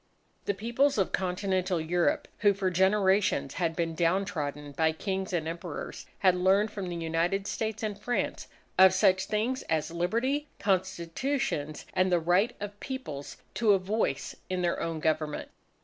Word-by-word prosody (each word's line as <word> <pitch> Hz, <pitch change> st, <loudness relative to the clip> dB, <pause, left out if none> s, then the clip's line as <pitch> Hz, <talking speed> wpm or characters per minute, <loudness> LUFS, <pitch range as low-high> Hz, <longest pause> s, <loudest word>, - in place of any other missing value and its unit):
The 200 Hz, -, 0 dB
Peoples 235 Hz, +7 st, +1 dB
of 195 Hz, -, +1 dB
Continental 185 Hz, -1 st, 0 dB
Europe, 170 Hz, +2 st, +1 dB
who 205 Hz, -2 st, +4 dB
for 190 Hz, -1 st, 0 dB
generations 190 Hz, -6 st, +3 dB
had 165 Hz, -1 st, +1 dB
been 165 Hz, -1 st, -1 dB
down 175 Hz, +4 st, +2 dB
trodden 145 Hz, -5 st, -4 dB
by 160 Hz, +2 st, +1 dB
Kings 190 Hz, +3 st, -3 dB
and 165 Hz, -3 st, -1 dB
Emperors, 170 Hz, -1 st, -6 dB
had 185 Hz, -2 st, +4 dB
learned 190 Hz, +4 st, +3 dB
from 195 Hz, -3 st, -4 dB
the 175 Hz, -, -4 dB
United 170 Hz, +4 st, 0 dB
States 220 Hz, +1 st, -3 dB
and 210 Hz, -2 st, -1 dB
France, 245 Hz, +3 st, -2 dB, 0.3 s
of 190 Hz, 0 st, +8 dB
such 185 Hz, 0 st, +4 dB
things 225 Hz, +6 st, -1 dB
as 160 Hz, -1 st, 0 dB
Liberty, 235 Hz, -, 0 dB
Constitutions, 190 Hz, -, -1 dB
and 185 Hz, 0 st, +2 dB
the 175 Hz, -, +4 dB
right 185 Hz, +8 st, +2 dB
of 205 Hz, 0 st, -6 dB
Peoples 255 Hz, -, -6 dB, 0.2 s
to 220 Hz, -3 st, +4 dB
a -, -, +5 dB
voice 185 Hz, -7 st, -1 dB
in 185 Hz, -1 st, -1 dB
their 175 Hz, -, +1 dB
own 165 Hz, -2 st, -3 dB
government. 155 Hz, -1 st, -1 dB
185 Hz, 160 wpm, -29 LUFS, 165-205 Hz, 0.3 s, of